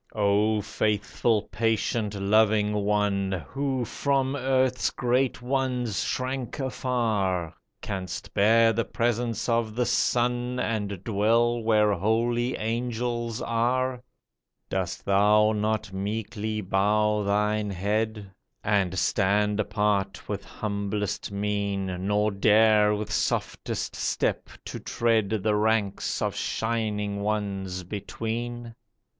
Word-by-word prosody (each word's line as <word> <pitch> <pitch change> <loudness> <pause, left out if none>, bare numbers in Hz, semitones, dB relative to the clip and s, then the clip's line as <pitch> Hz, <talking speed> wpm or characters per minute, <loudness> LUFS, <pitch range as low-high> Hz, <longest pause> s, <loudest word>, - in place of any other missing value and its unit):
O 105 +1 +2
faithful, 105 +1 0
patient, 110 0 0
loving 105 +1 +3
one, 100 -4 0
Who 135 -2 -1
from 135 +3 0
earth's 130 -1 +1
great 125 0 0
ones 125 -5 -1
shrank 130 -1 -3
afar, 110 - -1 0.3
Canst 95 -3 -5
bear 115 +2 +5
the 115 +2 0
presence 115 +1 -1
of 115 -2 0
The 125 0 +1
Son, 125 +1 +1
And 105 -5 -2
dwell 115 +3 +2
where 105 -2 +3
holy 115 +5 +1
angels 120 0 -2
are? 125 +2 0 0.7
Dost - - -3
thou 105 +2 +4
not 110 -1 -1
meekly 105 +2 -3
bow 105 +2 +2
thine 105 +1 +1
head. 105 +2 -2 0.3
And 95 -3 +1
stand 105 +2 +2
apart 105 -2 0
with - - -4
humblest 100 -1 -3
mien, 100 -2 -2
Nor 105 +1 +2
dare 105 +1 +4
with 105 0 -4
softest - - -2
step - - -1 0.2
to - - -6
tread 115 -4 +1
The 110 - +2
ranks 105 -2 0
of - - -1
shining 105 -3 -2
Ones 100 -3 -2
between 115 +5 -5
105 Hz, 105 wpm, -26 LUFS, 100-115 Hz, 0.7 s, bear